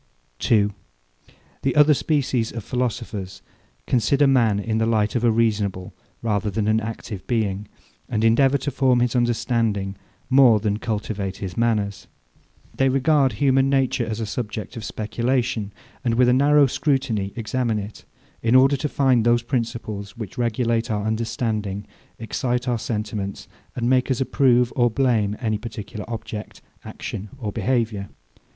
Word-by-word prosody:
2. 105 -2 +2 0.9
The 135 - 0
other 150 0 +6
species 135 -6 0
of 115 -2 -6
philosophers 115 -6 -3 0.4
consider 140 +4 +2
man 120 -7 +3
in 110 +2 -1
the 110 - +1
light 110 -2 +1
of 120 - 0
a 120 - +5
reasonable 105 -4 0 0.3
rather 105 -2 0
than 105 +1 -1
an 110 +1 +3
active 110 -3 -6
being, 105 -4 -1 0.4
and 110 - -1
endeavour 135 +5 +4
to 140 +2 -3
form 130 -2 +3
his 120 0 +1
understanding 115 -4 0 0.3
more 130 -5 +6
than 105 0 -1
cultivate 105 -3 -3
his 95 -3 -6
manners. 105 -4 0 0.7
They 135 0 +2
regard 135 +1 +3
human 135 -1 +3
nature 135 -3 +1
as 115 -1 -4
a 115 - -2
subject 110 +1 -5
of 115 - -6
speculation; 115 0 -1 0.3
and 115 -3 +1
with 125 +1 +4
a - - +5
narrow 145 +2 +5
scrutiny 130 -8 0
examine 115 0 -1
it, 105 +1 -7 0.4
in 115 +2 +2
order 135 +2 +6
to 150 +3 -2
find 130 -5 +3
those 120 0 +3
principles, 115 -5 -4
which 110 -3 -7
regulate 115 -1 0
our 105 -1 -1
understanding, 110 -3 -2 0.3
excite 125 +2 -2
our 120 -2 0
sentiments, 105 -3 -4 0.3
and 120 -1 -1
make 130 +1 +2
us 130 - 0
approve 125 -2 +3
or 120 -2 +3
blame 110 -5 +1
any 110 -4 -1
particular 105 -1 -7
object, 110 -2 -6 0.2
action, 100 +2 -6
or 110 -6 -4
behaviour. 110 -5 -1
115 Hz, 150 wpm, -23 LUFS, 105-125 Hz, 0.9 s, other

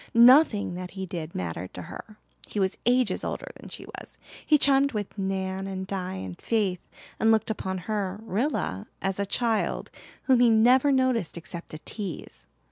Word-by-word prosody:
Nothing 240 - +6
that 180 0 -6
he 190 - -3
did 170 -2 -6
mattered 90 0 -4
to 90 - -6
her. 215 - -10 0.3
He 210 - -3
was 190 -1 +1
ages 250 0 +2
older - - -4
than - - -11
she - - -9
was. - - -11 0.3
He 305 - +5
chummed 275 -1 +4
with 205 -2 -4
Nan 190 -1 -2
and 190 -1 -4
Di 190 -1 -4
and 95 -2 -7
Faith, 200 -6 0 0.4
and 225 - +4
looked 220 0 +2
upon 190 -3 -3
her, 205 -2 -2
Rilla, 215 - -2 0.2
as 195 0 -1
a 200 - 0
child 225 +1 0 0.3
whom 260 -3 +4
he 245 -1 +6
never 250 +5 +5
noticed 255 - +1
except 170 0 -7
to 155 - -7
tease. 190 +1 -7
200 Hz, 175 wpm, -27 LUFS, 185-235 Hz, 0.4 s, Nothing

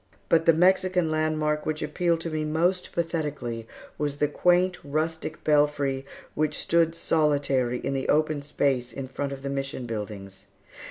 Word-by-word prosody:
But 165 0 +3
the 165 - +8
Mexican 180 0 +3
landmark 155 -1 0
which 155 0 -2
appealed 170 +2 0
to 165 - -4
me 155 0 -1
most 170 +4 0
pathetically 150 -9 -3 0.3
was 145 -1 -1
the 150 - +2
quaint 180 +4 +2
rustic 155 +2 -3
belfry 145 -3 +2 0.3
which 155 0 0
stood 165 -1 +2
solitary 140 -6 +1
in 135 - -3
the 135 -1 -2
open 155 -1 +2
space 135 -3 0
in 135 -1 -6
front 140 +2 -4
of 135 0 -7
the 140 - -3
Mission 135 -2 -3
buildings. 105 -4 -6
150 Hz, 155 wpm, -26 LUFS, 135-165 Hz, 0.3 s, the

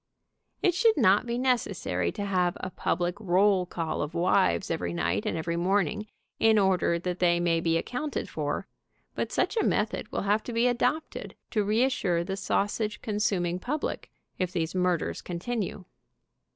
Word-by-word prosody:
It 360 - +4
should 445 +3 +3
not 210 -2 +4
be 235 0 -1
necessary 200 - 0
to 205 - -3
have 180 -3 +1
a 185 - -5
public 175 0 -1
roll 190 -1 +3
call 165 -3 -3
of 150 +3 -4
wives 170 - +2
every 85 -1 -2
night 85 +4 -1
and - - -1
every 170 +1 -2
morn 190 +1 +2
ing 210 +5 -6 0.3
in 225 -1 +5
order 190 -3 +3
that 180 +1 -3
they 175 -1 +3
may 170 -1 +2
be 165 0 +1
accounted 275 - -3
for, - - -3 0.5
but - - -3
such - - 0
a - - +3
method - - 0
will - - -2
have 205 +2 +2
to 240 - -5
be 230 +1 +2
adopted 250 +6 -1 0.2
to 215 -3 +1
reassure 210 -5 +1
the 190 +2 -3
sausage 205 +2 -1
consuming 195 -5 0
public, 285 +9 -3 0.3
if 185 -1 0
these 165 -3 -2
murders 180 -2 0
continue. 190 +1 -4
190 Hz, 165 wpm, -28 LUFS, 170-220 Hz, 0.5 s, in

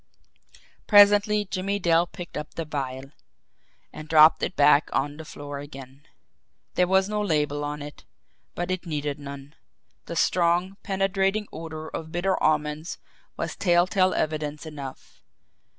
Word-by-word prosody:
Presently 205 0 +6
Jimmie 195 +1 -2
Dale 170 -2 +2
picked 175 -2 -9
up 150 - -6
the 165 - -3
vial 135 -2 -5 0.8
and 155 0 -9
dropped 155 0 +7
it - - -2
back 145 +1 +5
on 145 +2 -1
the 160 - -9
floor 145 -1 -7
again. 135 -1 -11 0.7
There 180 - +2
was 190 +1 +3
no 210 0 -1
label 150 -6 0
on 145 0 -4
it, 145 0 -10 0.5
but 175 +1 -3
it 185 -1 -3
needed 150 -2 -3
none 140 0 -9 0.5
the 170 - -5
strong, 175 +3 +1
penetrating 195 +1 0
odor 160 -1 -7
of 160 0 -7
bitter 180 +2 0
almonds 155 +1 0 0.4
was - - -3
telltale 185 +1 +2
evidence 150 0 -2
enough. 145 -4 -9
160 Hz, 135 wpm, -25 LUFS, 145-185 Hz, 0.8 s, dropped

